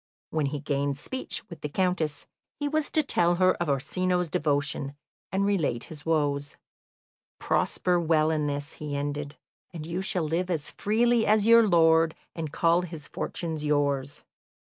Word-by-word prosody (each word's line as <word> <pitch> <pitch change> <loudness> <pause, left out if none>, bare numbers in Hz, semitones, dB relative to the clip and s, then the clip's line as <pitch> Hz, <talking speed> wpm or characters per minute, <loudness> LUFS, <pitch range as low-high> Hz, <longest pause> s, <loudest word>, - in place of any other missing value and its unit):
When 155 -3 0
he 145 +1 -3
gained 140 -1 -1
speech 260 - -5
with 170 - -11
the 150 - -3
Countess, 165 -3 -1 0.3
he 290 - -1
was 310 0 0
to 310 - +2
tell 175 -10 +2
her 185 +1 +4
of 170 - 0
Orsino's 180 +5 0
devotion, 145 -1 -1 0.4
and 195 +1 +1
relate 165 -12 0
his 155 -1 -9
woes. 145 -3 0 0.8
"Prosper 180 -1 +1
well 160 -1 +2
in 150 -2 0
this," 145 +1 -4
he 150 -2 -5
ended, 145 0 -4 0.3
"and 160 -3 -7
you 170 +3 -3
shall 185 -2 0
live 170 +4 -1
as 160 -5 -2
freely 230 +2 +2
as 210 -1 +4
your 230 -1 +7
lord, 165 -2 +4 0.2
and 160 -3 -4
call 170 +2 +3
his 165 -5 -7
fortunes 160 -3 -3
yours." 145 -2 0
160 Hz, 160 wpm, -27 LUFS, 145-180 Hz, 0.8 s, your